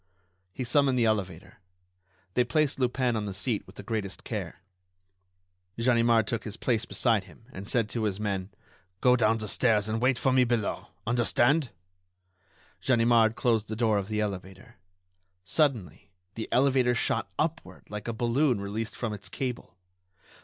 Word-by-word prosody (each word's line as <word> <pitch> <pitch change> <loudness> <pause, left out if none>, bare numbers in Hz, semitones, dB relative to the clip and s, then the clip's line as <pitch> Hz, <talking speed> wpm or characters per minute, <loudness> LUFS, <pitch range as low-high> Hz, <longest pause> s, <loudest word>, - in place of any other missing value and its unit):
He 130 - -5
summoned 135 0 +3
the 120 - +3
elevator. 100 0 -2 0.7
They 125 - +3
placed 150 +2 0
Lupin 125 -1 +1
on 105 -1 -2
the 100 - -4
seat 105 +2 -1
with 95 - -15
the - - -9
greatest 110 -5 -4
care. - - -5 1.1
Ganimard 115 -1 +3
took 115 0 -3
his 105 0 -6
place 115 -3 0
beside 115 -6 +1
him 95 +4 -18
and 95 +2 -8
said 115 -2 +1
to 115 -1 -2
his 100 -1 -1
men: 100 -3 -2 0.5
"Go 125 +3 +5
down 115 -2 +3
the 110 -1 -4
stairs 105 -1 +2
and 110 +1 -2
wait 130 0 +3
for 130 - +1
me 130 -1 +5
below. 120 -4 -1 0.2
Understand?" 120 +4 +2 1.1
Ganimard 115 -2 +4
closed 115 -4 +1
the 110 - -4
door 110 -2 +2
of 95 - -5
the 105 0 -1
elevator. 100 +3 -6 0.7
Suddenly 100 - 0 0.2
the 110 - -5
elevator 130 -2 +3
shot - - 0
upward 165 +1 -3
like 105 +1 -7
a - - 0
balloon 120 +2 +1
released 105 +3 -4
from 115 -3 -3
its 100 -1 -7
cable. 125 -8 -5
115 Hz, 160 wpm, -28 LUFS, 105-125 Hz, 1.1 s, Go